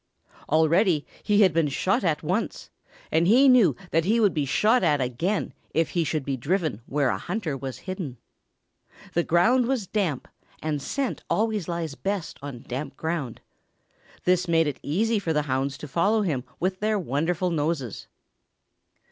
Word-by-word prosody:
Already 160 +1 +3 0.2
he 210 0 +3
had 185 -5 +4
been 165 -2 +2
shot 185 +8 0
at 165 -4 0
once 185 +8 -2 0.4
and 165 +2 +3
he 255 +7 +6
knew 240 - +6 0.2
that 165 +1 +2
he 220 +7 +2
would 205 -5 +3
be 150 -3 0
shot 220 - +3
at 150 -4 +3
again 135 - -1 0.2
if 165 +1 +2
he 170 - +1
should 150 -2 -2
be 140 - -1
driven 150 - -1
where 140 -2 +1
a - - -1
hunter 175 -6 -3
was 135 -1 -6
hidden. 185 -9 -5 1.0
The 170 - +3
ground 230 +10 +3
was 255 -6 0
damp 180 - -1 0.3
and 150 -2 -2
scent 275 - -3
always 215 -4 0
lies 170 -4 -3
best 195 +2 -4
on 140 -4 -8
damp 135 +2 -5
ground. 160 -7 -3 0.8
This 180 0 +2
made 165 -1 +3
it 145 -3 -3
easy 215 +8 +1
for 165 -5 -1
the 150 -1 +1
hounds 135 0 -1
to 150 - -8
follow 200 +9 +2
him 140 -9 -1
with 185 +1 -1
their 215 0 +1
wonderful 170 +2 -1
noses. 150 - -2
165 Hz, 165 wpm, -25 LUFS, 145-200 Hz, 1.0 s, he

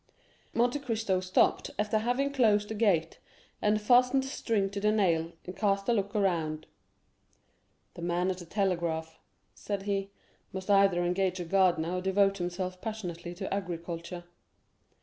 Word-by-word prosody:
Monte 245 +4 +2
Cristo 225 -8 -1
stopped 185 0 +2
after 210 +1 +1
having 250 +5 0
closed 210 -6 +3
the - - -3
gate 190 -7 +1 0.4
and 210 0 +2
fastened 250 +4 +4
the - - -5
string 220 -7 0
to 200 - -3
the 210 +1 +2
nail, 170 -6 +1
and 180 - -7
cast 195 0 0
a 240 - +3
look 200 -2 -1
around. 165 -6 0 1.3
"The - - -10
man 175 +2 0
at 185 - -5
the 175 - -10
telegraph," 170 -5 -1 0.3
said 200 -2 -4
he, 195 -1 -1 0.4
"must 190 +1 -3
either 195 -3 +4
engage 185 +1 0
a 175 - -3
gardener 180 -1 +2
or - - -2
devote 195 +1 +2
himself 180 +1 -4
passionately 175 -6 -5
to 190 +2 -4
agriculture." 175 -2 -5
195 Hz, 150 wpm, -30 LUFS, 175-210 Hz, 1.3 s, fastened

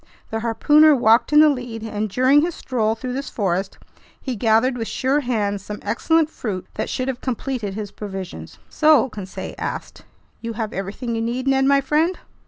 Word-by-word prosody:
The 225 - -1
harpooner 295 +7 +5
walked 230 0 +3
in 300 0 +7
the 310 - +7
lead, 245 -5 -4
and 215 -1 -3
during 260 +7 +4
his 335 +1 -2
stroll 225 -4 -1
through 250 +2 -5
this 275 +2 -4
forest, 190 -2 -2 0.4
he 260 -3 -4
gathered 225 +4 +2
with 225 -2 -4
sure 270 +3 0
hands 210 -7 -1
some 210 +1 -6
excellent 320 +9 +2
fruit 190 - -5
that - - -3
should 255 - -2
have 260 -2 -3
completed 245 -5 -3
his 205 -2 -5
provisions. 190 - -7
"So," 305 -5 +4
Conseil 195 -4 -7
asked, - - -5 0.4
"you 230 0 -4
have 220 -1 -4
everything 200 +5 -4
you 225 - -1
need, 245 +3 -2
Ned 270 0 +3
my 280 0 +4
friend?" 310 +6 +1
235 Hz, 185 wpm, -21 LUFS, 210-270 Hz, 0.4 s, in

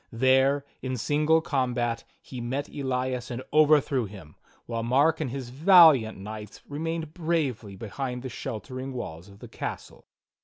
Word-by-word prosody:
There, 130 +3 +3 0.2
in 130 -1 -3
single 150 +6 +2
combat, 125 -5 -1
he 125 -2 -8
met 135 +5 -3
Elias 130 -3 -2
and 125 +1 -5
overthrew 150 -4 +4
him, 95 -7 -12 0.3
while 115 -1 -3
jMark 145 +7 +3
and 145 - -1
his 130 -1 -6
valiant 155 - +6
knights 105 +1 -8
remained 160 +1 -4
bravely 145 - -2
behind 125 +4 -5
the - - -4
sheltering 130 +2 -6
walls 90 -7 -7
of 100 - -15
the - - -11
castle. - - -7
130 Hz, 145 wpm, -27 LUFS, 115-145 Hz, 0.3 s, valiant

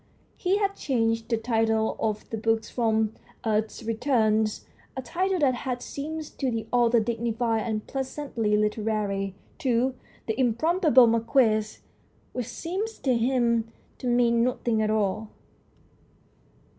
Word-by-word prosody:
He 375 +2 +1
had 400 -1 0
changed 225 -4 0
the 230 - +2
title 225 -1 +1
of 215 -1 -2
the 225 - -2
book 225 0 +1
from 220 -2 0 0.3
"Earth's 220 +1 -1
Returns 220 -2 +1 0.3
"a - - -1
title 370 +7 0
that 270 -3 +4
had 250 0 -4
seemed 315 +3 -5 0.2
to 270 - +1
the 225 -2 -2
author 240 -1 +4
dignified 230 0 0
and 215 -1 -2
pleasantly 265 -5 -1
literary 210 -2 -1 0.2
to 255 -3 +1 0.2
" - - -29
The 220 +3 -2
Improbable 265 - +4
Marquis," 225 -2 +2 0.6
which 250 -3 -3
seemed 360 - -3 0.2
to 260 - +3
him 235 -2 +1 0.3
to 255 - -4
mean 235 -1 +3
nothing 235 -2 0
at 215 - +1
all. 215 0 0
230 Hz, 130 wpm, -26 LUFS, 220-260 Hz, 0.6 s, that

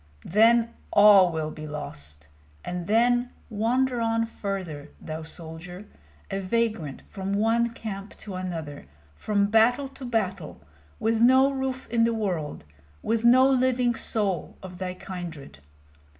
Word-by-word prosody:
Then 230 +4 +4 0.2
all 205 -3 +7
will 155 -1 -3
be 155 0 -8
lost! 75 - -8 0.4
And 175 -1 -4
then 240 +3 +3 0.2
wander 240 +3 +1
on 230 0 +1
farther, 185 -9 -5
thou 160 0 -6
soldier, 165 +4 -9 0.5
a 195 - -1
vagrant 195 - -1
from 195 -1 -4
one 225 +3 +2
camp 210 -3 -7
to 205 - -9
another, 165 - -6 0.3
from 200 - 0
battle 245 +5 +4
to 270 0 -12
battle, 195 - -2 0.4
with 225 0 +1
no 260 +3 +6
roof 265 -1 -3
in 230 -1 +3
the 230 0 +2
world, 175 - -3 0.4
with 225 0 0
no 255 +2 +6
living 255 -2 +2
soul 205 -6 -2
of 180 -1 -9
thy 185 -1 -4
kindred! 170 - -8
205 Hz, 135 wpm, -26 LUFS, 175-235 Hz, 0.5 s, all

